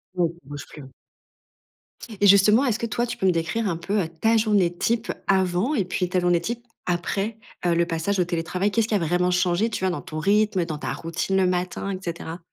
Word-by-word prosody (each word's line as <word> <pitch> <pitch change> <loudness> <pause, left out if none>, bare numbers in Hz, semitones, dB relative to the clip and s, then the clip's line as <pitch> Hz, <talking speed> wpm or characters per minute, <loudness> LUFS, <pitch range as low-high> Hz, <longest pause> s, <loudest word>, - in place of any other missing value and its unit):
Oui, 175 -2 +2
tu - - -26
bouges 145 0 -7
plus, 150 - -11
oui. 135 - -12 1.3
Et 205 - +6
justement, 210 +6 +6
est-ce 235 -4 0
que 235 - -1
toi, 235 +1 -1
tu - - -5
peux - - -2
me 185 - +5
décrire 170 +6 -1
un 170 - -2
peu 195 +1 -1
ta 225 +1 +4
journée 205 -6 +2
type 230 +5 0 0.2
avant 190 +6 +2
et 205 -8 +1
puis, 180 0 -2
ta 185 0 +1
journée 175 -1 +2
type 235 +6 -4 0.2
après, 195 +5 -2 0.3
heu, 175 - +3
le 170 0 +3
passage 170 +4 -1
au 180 - +3
télétravail? 175 +3 -1
Qu'est-ce 225 +1 +1
qui 220 - 0
a - - +2
vraiment 180 +2 +1
changé, 180 +4 +2
tu 210 - -4
vois, 190 - +2
dans 175 - -4
ton 155 - -6
rythme, 200 0 +2
dans 155 -2 -4
ta - - -4
routine 165 +3 -2
le 185 -1 +3
matin 180 +2 -2
et - - -7
cetera? 170 -1 -5
185 Hz, 230 wpm, -24 LUFS, 170-210 Hz, 1.3 s, Et